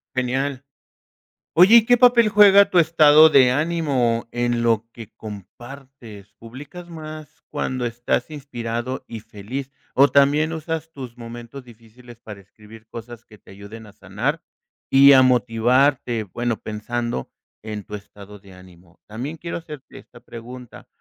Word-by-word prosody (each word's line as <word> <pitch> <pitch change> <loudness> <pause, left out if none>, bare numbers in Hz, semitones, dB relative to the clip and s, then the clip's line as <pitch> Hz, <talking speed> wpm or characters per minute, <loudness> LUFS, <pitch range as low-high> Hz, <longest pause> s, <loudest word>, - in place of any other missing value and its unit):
Genial. 130 +2 -2 0.9
Oye, 185 +7 +7
¿y 230 - +6
qué 245 - +5
papel 240 -2 +4
juega 200 -1 +6
tu 180 - +2
estado 155 -1 +6
de 130 -4 +5
ánimo 140 -7 -1
en 120 -1 -1
lo 115 -1 0
que 115 -3 -12
compartes? 115 +1 -12
¿Publicas 145 +9 -12
más 155 -2 -11
cuando 130 -2 -3
estás 120 +3 -3
inspirado 125 -4 -6
y 115 -2 -8
feliz? 115 +5 -8 0.2
O 140 +2 +5
también 145 +4 +2
usas 160 0 -5
tus 130 -5 -10
momentos 120 +2 -10
difíciles 120 +1 -17
para 105 -3 -11
escribir 110 +3 -17
cosas 120 +1 -11
que 105 - -18
te - - -20
ayuden 100 +3 -12
a 105 - -16
sanar 115 - -4 0.5
y 140 +1 +7
a 130 - +7
motivarte, 125 0 +1
bueno, 120 +4 -4
pensando 115 - -5 0.3
en 105 -1 -7
tu 105 - -11
estado 105 0 -12
de 95 -1 -18
ánimo. 90 -2 -19
También 125 +9 -6
quiero 170 +2 -6
hacerte 150 -5 -12
esta - - -18
pregunta. 120 +1 -12
120 Hz, 145 wpm, -21 LUFS, 110-145 Hz, 0.9 s, Oye